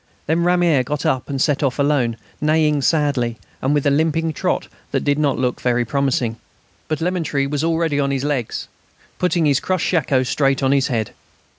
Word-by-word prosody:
Then 165 +3 +1
"Ramier" 175 -5 +3
got 145 +3 -3
up 130 +2 0
and 140 -1 -2
set 145 0 +1
off 135 -4 0
alone, 140 -5 +1 0.2
neighing 150 -1 +2
sadly, 135 -6 +1 0.2
and 135 - +1
with 145 -1 +1
a 145 - +4
limping 160 +2 +1
trot - - -1 0.2
that - - -1
did 145 +1 +1
not 145 -3 +1
look 125 -1 -1
very 125 -1 +1
promising. 125 -3 0 0.5
But 155 - -1
Lemaître 165 -6 0
was 145 +1 -2
already 165 -3 +1
on 140 -1 +1
his 135 -1 -1
legs, 140 -6 -2 0.5
putting 175 -2 +1
his 140 -3 +3
crushed 185 -2 -1
shako 140 -6 +2
straight 135 +1 +1
on 135 - +3
his 140 -1 +2
head. 115 -4 -2
145 Hz, 185 wpm, -20 LUFS, 130-160 Hz, 0.5 s, a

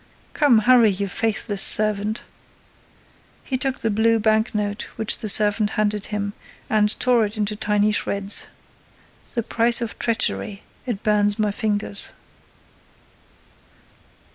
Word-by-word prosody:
Come 285 -7 +3
hurry, 245 -3 +5
you 200 0 -2
faithless 210 0 -2
servant." 215 +1 +2 1.2
He 265 - -3
took 260 +1 -1
the 225 - 0
blue 225 +2 +2
bank 220 +1 0
note 205 0 -3
which 220 -2 +2
the 215 - -3
servant 210 +1 +3
handed 210 -1 -1
him 205 -1 -4 0.4
and 210 -1 +1
tore 245 -2 +3
it 210 +1 -4
into 210 0 -2
tiny 210 0 +1
shreds: 200 -1 +1 0.9
"The 235 - -1
price 235 +2 +2
of 235 -2 -6
treachery! 220 -3 -1 0.2
It 225 -5 -4
burns 205 -1 +1
my 210 -2 0
fingers." 205 -1 -2
215 Hz, 125 wpm, -21 LUFS, 205-225 Hz, 1.2 s, hurry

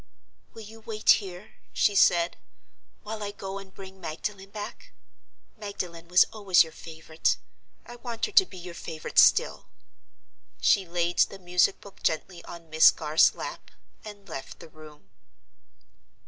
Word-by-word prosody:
"Will 225 - -9
you 220 +2 -12
wait 220 -1 -8
here," 185 0 -11 0.2
she 205 - +2
said, 175 -3 +3 0.7
"while 215 +1 -6
I 205 - -3
go 195 -1 -7
and 195 -1 -13
bring 190 0 -12
Magdalen 195 +4 -5
back? 215 - -9 0.6
Magdalen 180 -6 -7
was 180 +2 +6
always 200 -5 +4
your 160 - -11
favorite: 160 -1 -2 0.5
I 240 - -11
want 235 -2 -4
her - - -7
to 390 -1 +6
be - - -12
your 175 0 -9
favorite 160 -1 -2
still." - - +4 0.9
She 195 -3 +3
laid 170 0 -1
the 195 - +2
music 180 0 +1
book 200 - -15
gently 170 +2 -2
on 170 -1 -11
Miss 155 0 +7
Garth's 155 0 +3
lap—and 205 -2 -11
left 135 -5 -8
the - - -13
room. 150 -9 -16
185 Hz, 145 wpm, -27 LUFS, 170-205 Hz, 0.9 s, Miss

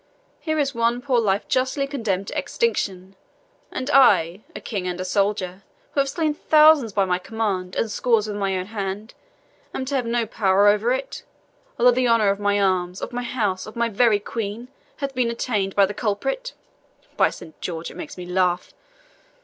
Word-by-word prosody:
Here 315 -1 -2
is 280 -2 0
one 235 +1 +1
poor 250 -2 +1
life 205 -2 0
justly 265 +2 0
condemned 220 -9 -2
to - - -7
extinction, 195 - -2 0.6
and 255 - -4
I, 195 - +5
a - - -5
king 195 -5 -4
and 180 0 -3
a 185 - -3
soldier, 195 -1 -1 0.3
who - - -1
have 275 0 +2
slain 310 +1 0
thousands 305 -5 +5
by 200 -1 +2
my 180 -1 0
command, 190 -3 -3
and 225 - -1
scores 225 0 +2
with 210 - -4
my 195 -2 -1
own 185 - -3
hand, 205 +1 -5 0.6
am 260 - -3
to 275 - -5
have 255 -4 0
no 235 0 0
power 200 -2 +2
over 210 +4 +3
it, 265 +2 -3 0.6
although 250 +1 +6
the 250 +1 +1
honour 225 -4 +4
of 200 - -3
my 205 0 +1
arms, 185 -2 0
of - - -6
my 245 - -2
house, 215 -7 -2
of 215 - -10
my 235 0 0
very 225 0 +3
Queen, 225 +3 -5 0.3
hath 275 -1 -4
been 250 -2 +1
attainted 210 -5 -2
by 200 - +6
the 200 - -5
culprit. - - -2 0.6
By - - +4
Saint 160 - -12
George, 165 -2 -5
it - - -14
makes 305 - -8
me 180 - -7
laugh! 180 0 0
215 Hz, 190 wpm, -23 LUFS, 195-250 Hz, 0.6 s, although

